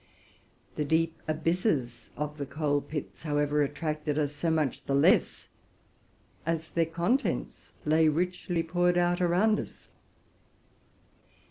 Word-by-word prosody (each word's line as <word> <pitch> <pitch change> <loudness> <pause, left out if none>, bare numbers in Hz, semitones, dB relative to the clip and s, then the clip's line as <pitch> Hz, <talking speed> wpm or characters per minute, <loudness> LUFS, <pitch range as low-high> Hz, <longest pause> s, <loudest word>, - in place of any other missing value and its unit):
The 150 - +1
deep 160 +2 0
abysses 155 - -1
of 150 0 -4
the 140 - -3
coal 145 0 0
levels, 150 -3 -5
however, 145 -1 +1
attracted 150 +1 -2
us 145 -1 0
so 155 +3 -1
much 155 -5 0
the 140 - 0
less 140 - +3 1.0
as 160 -1 -2
their 165 -1 +1
contents 175 +12 -1
lay 155 +1 +4
richly 175 +2 0
poured 175 +1 +1
out 175 +1 +2
around 185 +5 +3
us. - - -9
155 Hz, 120 wpm, -29 LUFS, 145-170 Hz, 1.0 s, lay